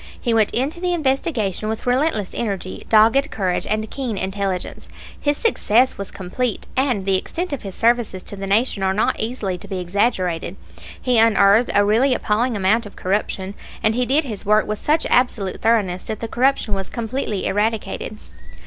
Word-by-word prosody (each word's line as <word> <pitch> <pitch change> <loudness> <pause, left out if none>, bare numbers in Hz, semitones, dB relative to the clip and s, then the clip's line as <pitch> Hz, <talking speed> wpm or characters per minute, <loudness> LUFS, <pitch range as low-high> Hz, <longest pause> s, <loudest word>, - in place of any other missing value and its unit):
He 235 - 0
went 220 -2 +3
into 285 +8 -1
the 355 0 0
investigation 265 - -1
with 220 0 -4
relentless 250 - 0
energy, 195 -5 -4
dogged 230 +7 +5
courage, 185 - -1
and 215 +1 -1
keen 250 -7 -3
intelligence. 190 -1 -3 0.3
His 290 0 0
success 255 - +2
was 200 - -6
complete, 205 +5 -3
and 255 -7 +1
the 190 -1 +2
extent 350 - -4
of 280 - -4
his 195 -2 -7
services 230 -5 +1
to - - -7
the 195 0 -5
Nation 210 +1 +1
are 190 0 +1
not 215 - +1
easily 215 -6 -2
to - - -12
be 190 - -4
exaggerated. 180 -2 -1 0.4
He 245 -2 +2
unearthed 220 0 +5
a 205 - +5
really 245 +6 +3
appalling 230 +2 0
amount 205 +4 +2
of 200 - -14
corruption, 195 0 -2 0.3
and 220 - +3
he 250 +1 0
did 290 +5 +3
his 220 -8 -6
work 210 +1 +3
with 210 0 -3
such 310 +2 +1
absolute 225 -6 +1
thoroughness 205 -6 +2
that 215 - -6
the 230 - -4
corruption 250 -2 +1
was 195 -1 -2
completely 225 -3 -3
eradicated. 215 +1 -1
220 Hz, 175 wpm, -21 LUFS, 195-250 Hz, 0.4 s, dogged